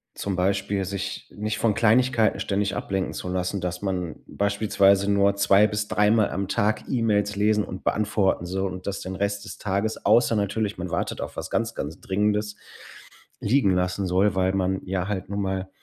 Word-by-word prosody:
zum 100 -2 -3
Beispiel 100 +2 0
sich 100 +1 -5
nicht 105 +1 -3
von 110 -2 +2
Kleinigkeiten 115 -2 +3
ständig 100 -1 -1
ablenken 95 -1 -2
zu 90 - -5
lassen, 90 +1 -2
dass 90 0 -3
man 90 -4 -2
beispielsweise 100 -1 +2
nur 100 0 +3
zwei 100 +1 +5
bis 105 -1 -2
dreimal 105 +1 +3
am 95 0 -2
Tag 105 +2 0
E-Mails 105 -4 +1
lesen 105 +1 +2
und 95 - -8
beantworten 105 -4 +1
soll 95 +1 -2
und 95 +1 -8
das 100 - -3
den 95 0 -5
Rest 100 +1 -2
des - - -8
Tages, 105 +2 -2
außer 120 -1 +4
natürlich, 105 +1 -1
man 90 +1 -4
wartet - - -2
auf - - -6
was - - -4
ganz, 115 0 -1
ganz 80 +5 -5
Dringendes, 105 +1 0 0.8
liegen 120 -3 +2
lassen 90 +2 -1
soll, 95 +2 +2
weil 95 0 +1
man 95 0 0
ja 95 -1 -2
halt 100 -3 -4
nun 100 0 -2
mal 95 -1 -2
100 Hz, 180 wpm, -25 LUFS, 95-105 Hz, 0.8 s, zwei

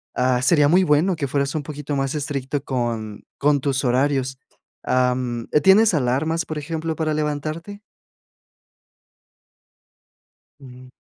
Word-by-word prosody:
Ah, 125 0 +2
sería 145 +1 +4
muy 180 +5 +4
bueno 165 +4 +2
que 150 -4 -3
fueras 140 +2 -1
un 155 - -2
poquito 145 0 -5
más 135 -1 -1
estricto 140 -2 -3
con 115 -6 -3 0.2
con 145 -1 +2
tus 135 -1 -1
horarios. 130 +1 0 0.5
Am, 125 -2 0 0.2
¿tienes 205 +3 +6
alarmas, 155 +5 0
por 155 -1 -4
ejemplo, 160 +1 -4
para 155 -1 -1
levantarte? 155 +6 -4 2.8
Ujú. 125 -1 -13
145 Hz, 120 wpm, -22 LUFS, 130-155 Hz, 2.8 s, tienes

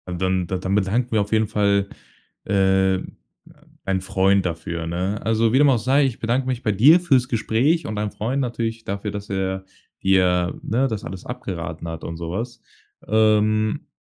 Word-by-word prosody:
Dann 95 0 0
da 95 - -2
dann 95 +1 -3
bedanken 105 +5 0
wir 110 -2 +2
auf 100 - -4
jeden 110 0 +3
Fall, 100 -2 +1 0.6
äh, 95 -1 +2 0.9
ein 95 -1 0
Freund 95 0 +2
dafür, 85 0 -4
ne? 90 +5 -2
Also, 115 +1 +2
wie - - +5
dem 145 -1 +6
auch 130 - +4
sei, 135 +5 +3
ich 130 -4 -3
bedanke 125 +3 0
mich 125 -1 -2
bei 105 - +1
dir 140 - +6
fürs 135 -8 +2
Gespräch 130 +8 +1
und 110 - -4
deinem 105 0 -2
Freund 125 +6 -2
natürlich 115 -2 -3
dafür, 100 +1 -4
dass 100 0 -7
er 95 -1 -2 0.4
dir, 90 -2 +2
ne, 125 +5 +1
das 110 -4 -4
alles 95 -2 -8
abgeraten 85 -9 -6
hat 80 -1 -6
und 85 - -5
so 85 0 -5
was. 115 +6 -5 0.5
Ähm, 110 0 +2
105 Hz, 180 wpm, -22 LUFS, 95-115 Hz, 0.9 s, dem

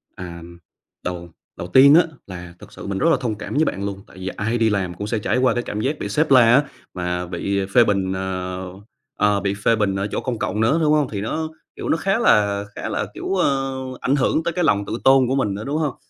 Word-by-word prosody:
À. 85 -2 -8 0.6
Đầu 85 -1 -5 0.3
đầu 85 - -5
tiên 135 +9 +7
á 175 - +7 0.2
là 90 -2 -9
thực - - -14
sự - - -9
mình 100 - -2
rất 165 - +2
là - - +3
thông 115 -4 -2
cảm 105 - -7
với 155 - +3
bạn 100 -7 -3
luôn, 100 -1 -4
tại - - -17
vì 95 0 -6
ai 115 +5 -2
đi 115 -1 +2
làm 95 -4 -1
cũng 100 +4 -6
sẽ 110 0 -1
trải 105 - 0
qua 130 -2 +3
cái 120 - -2
cảm 105 -2 -4
giác 145 +5 -1
bị - - -4
sếp 155 -1 0
la 130 - +8
á, 145 - +4 0.3
mà 90 0 -3
bị 95 +3 -2
phê 120 - +8
bình, 95 -3 0
ờ, 95 -1 -4 0.5
ờ, 105 -1 +3
bị 100 0 -1
phê 115 - +5
bình 105 -3 0
ở 95 +1 -1
chỗ - - -1
công 125 -4 -3
cộng 105 - -2
nữa, 130 +9 +3
đúng 150 -1 +3
hông? 150 -3 +2
Thì 100 -2 -4
nó, 155 +9 -3 0.3
kiểu, - - -5
nó - - +2
khá 195 +5 0
là 100 - +3
khá - - -5
là, - - -2
kiểu, 195 - -3
ơ, 135 -6 0 0.3
ảnh 135 - +1
hưởng 145 +3 +1
tới 170 - -2
cái 180 - 0
lòng 100 -8 +2
tự 110 +3 -4
tôn 135 -1 +5
của 130 - 0
mình 120 -7 0
nữa, 105 - -6
đúng 145 +2 -2
hông? 150 -5 -1
105 Hz, 260 wpm, -21 LUFS, 95-135 Hz, 0.6 s, la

